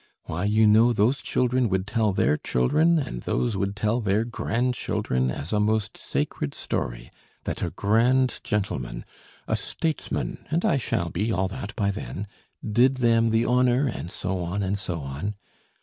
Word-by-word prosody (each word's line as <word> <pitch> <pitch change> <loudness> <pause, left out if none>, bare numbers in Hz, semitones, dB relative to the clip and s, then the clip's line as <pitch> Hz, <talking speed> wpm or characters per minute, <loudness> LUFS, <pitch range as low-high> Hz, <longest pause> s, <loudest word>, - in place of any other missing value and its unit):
Why 90 +5 -3
you 110 +2 +4
know 110 +3 +6
those 120 +5 +2
children 125 -1 +1
would 95 0 0
tell 110 0 +1
their 75 -5 +2
children, 155 - +2
and 95 - -3
those 120 -4 -1
would 100 +1 -1
tell 105 +3 0
their 105 +1 +1
grandchildren 115 - -1
as 70 - -4
a 105 - +2
most 105 -1 +1
sacred 70 - -3
story - - -4 0.3
that - - -4
a - - 0
grand 125 +5 +2
gentleman, 65 -13 -2 0.4
a - - +1
statesman 160 -2 -3
(and 165 +3 0
I - - +3
shall 85 -7 -1
be 105 +8 -1
all 95 -1 +1
that 105 0 -7
by 100 -4 +1
then) 100 0 -5 0.4
did 125 +5 +4
them 115 -2 +3
the 115 +1 +2
honour, 125 +2 +3
and 100 -8 -4
so 95 +1 -3
on, 90 +4 -2
and 100 +1 -1
so 90 -6 -3
on. 70 +10 -4
105 Hz, 165 wpm, -25 LUFS, 95-120 Hz, 0.4 s, know